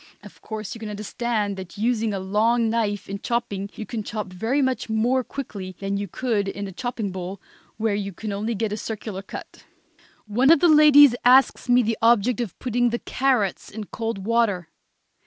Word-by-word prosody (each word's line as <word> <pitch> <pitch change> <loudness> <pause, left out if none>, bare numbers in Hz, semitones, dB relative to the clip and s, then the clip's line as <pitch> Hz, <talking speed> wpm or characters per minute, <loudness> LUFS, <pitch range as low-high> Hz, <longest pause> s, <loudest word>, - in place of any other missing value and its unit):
Of - - -14
course 215 -2 -6
you 230 - -9
can 220 -1 -6
understand 210 0 -2
that 190 +1 -9
using 225 0 0
a 200 - -2
long 220 +4 +1
knife 205 -3 -1
in 200 +1 -5
chopping 210 -4 -2
you 215 - -6
can 230 -1 -4
chop 210 -3 -5
very 225 +10 0
much 260 -4 0
more 240 +4 +1
quickly 200 -9 -7
than 195 0 -2
you 200 0 -3
could 215 0 -1
in 200 +1 -4
a - - -7
chopping 230 -1 -4
bowl, 185 +1 -6 0.4
where 220 -1 0
you 200 -1 -2 0.2
only 215 +3 -2
get 215 0 -2
a - - -3
circular 215 -3 -5
cut. 195 - -10 0.6
One 240 +6 +2
of 330 - +7
the 350 - +4
ladies 295 -3 +8
asks 255 0 +4
me 245 0 +5
the 225 0 -1
object 235 +1 +3
of 225 -6 -5
putting 245 -1 +1
the 235 - -1
carrots 250 -7 0
in 220 +1 -6
cold 225 -2 -5
water. 220 -7 +1
220 Hz, 190 wpm, -24 LUFS, 200-240 Hz, 0.6 s, ladies